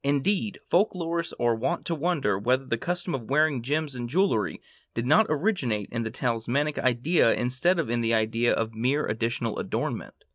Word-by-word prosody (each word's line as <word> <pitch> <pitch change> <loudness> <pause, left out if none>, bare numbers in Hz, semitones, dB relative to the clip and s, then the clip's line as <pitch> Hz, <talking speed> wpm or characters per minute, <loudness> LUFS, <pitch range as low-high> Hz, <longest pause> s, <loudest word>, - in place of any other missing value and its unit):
Indeed, 185 +9 0
folklorists 170 -3 0
are 120 -1 +3
wont 165 +10 -2
to 170 - -1
wonder 155 - 0
whether 130 +5 +1
the 120 - 0
custom 175 +2 -2
of 125 -4 -4
wearing 145 -2 +2
gems 145 +3 -1
in 120 -1 -4
jewelry 145 - +1 0.4
did 115 - -1
not 200 - +5
originate 145 - 0
in 115 - -2
the 115 - -2
talismanic 125 +5 -1
idea 130 +2 +3
instead 130 +9 +1
of 165 - 0
in 120 +1 0
the 115 0 +2
idea 115 +2 +1
of 115 0 -1
mere 125 +7 0
additional 115 0 -2
adornment. - - -3
130 Hz, 175 wpm, -26 LUFS, 115-165 Hz, 0.4 s, not